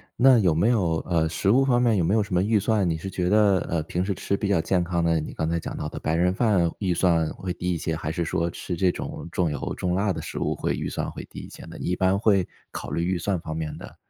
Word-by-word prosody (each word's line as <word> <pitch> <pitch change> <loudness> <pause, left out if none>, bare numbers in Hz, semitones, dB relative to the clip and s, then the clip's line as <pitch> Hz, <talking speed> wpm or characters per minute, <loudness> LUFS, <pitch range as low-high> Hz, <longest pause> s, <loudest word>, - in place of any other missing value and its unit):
那 130 -1 +6
有 90 -6 +3
没 100 +8 +3
有， 90 -9 +2
呃， 80 -2 +1
食 95 +4 +1
物 135 +3 +5
方 125 -2 +3
面 115 -4 +3
有 90 - +2
没 90 +5 +1
有 110 - +3
什 100 - -7
么 90 - +3
预 105 +1 +2
算？ 105 -2 +1
你 80 - 0
是 95 +4 -6
觉 90 -1 -1
得， 105 -3 +4
呃， 80 -2 0
平 90 +3 -2
时 100 0 -1
吃 100 - -1
比 100 - -2
较 100 -4 +2
健 90 +1 +1
康 85 -1 -1
的， 85 -1 +2
你 75 - -6
刚 80 - -2
才 85 0 0
讲 - - -6
到 75 - -3
的 - - -6
白 80 +1 -1
人 90 +2 +2
饭 95 -6 +2
预 95 -4 0
算 85 -3 +2
会 90 -2 -4
低 90 0 -2
一 - - -1
些， 80 +1 -2
还 80 0 -3
是 85 0 -2
说 85 +1 0
吃 90 +1 -5
这 90 +1 +2
种 - - -6
重 85 -5 0
油 75 - -3
重 90 -1 -1
辣 100 0 +1
的 - - -4
食 - - -6
物 - - -1
会 - - -1
预 - - -3
算 - - -3
会 - - -8
低 - - -8
一 - - -10
些 - - -11
呢？ - - -10
一 90 - -1
般 95 +1 +2
会 100 -4 +2 0.2
考 - - -6
虑 85 - -1
预 90 0 0
算 95 +1 -1
方 80 -2 -6
面 80 -2 -4
的， - - -11
90 Hz, 320 characters per minute, -25 LUFS, 85-100 Hz, 0.2 s, 那